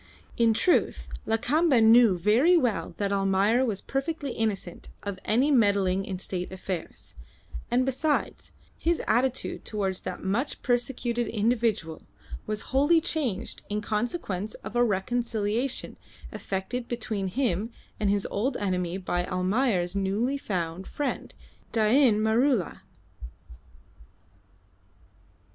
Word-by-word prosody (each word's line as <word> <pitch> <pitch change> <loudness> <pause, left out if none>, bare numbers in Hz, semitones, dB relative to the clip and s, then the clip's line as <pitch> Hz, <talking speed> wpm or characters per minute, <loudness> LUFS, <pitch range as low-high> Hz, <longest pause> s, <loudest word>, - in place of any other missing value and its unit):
In 230 -2 +3
truth, 355 +9 +1 0.2
Lakamba 255 +6 +3
knew 225 -3 +6
very 235 - +4
well 210 - -1
that 200 -1 -1
Almayer 195 +5 +2
was 215 -6 -2
perfectly 280 0 -3
innocent 210 -6 -3
of 200 -2 -5
any 255 +7 +3
meddling 200 -6 +3
in 190 -3 -4
state 180 -1 -4
affairs; 185 -2 -5 0.6
and 245 +2 +2
besides, 290 +3 -1 0.3
his 340 0 +1
attitude 255 +3 0
towards 195 -3 -2
that - - -6
much 215 +9 -2
persecuted 240 -1 0
individual 220 -7 0 0.5
was 215 0 -1
wholly 290 +5 +5
changed 265 - -1
in 210 0 -1
consequence 210 - -2
of - - -7
a 240 - +4
reconciliation 230 +3 -1 0.3
effected 230 +6 -4
between 215 -4 -3
him 220 -1 -1 0.3
and 210 -2 +1
his 200 -1 +1
old 245 +6 -1
enemy 180 -3 -1
by 175 -1 -2
Almayer's 185 0 0
newly 210 +8 0
found 180 -4 -3
friend, 290 - -4 0.4
Dain 225 +1 +4
Maroola. 220 - +1
220 Hz, 115 wpm, -27 LUFS, 195-250 Hz, 0.6 s, knew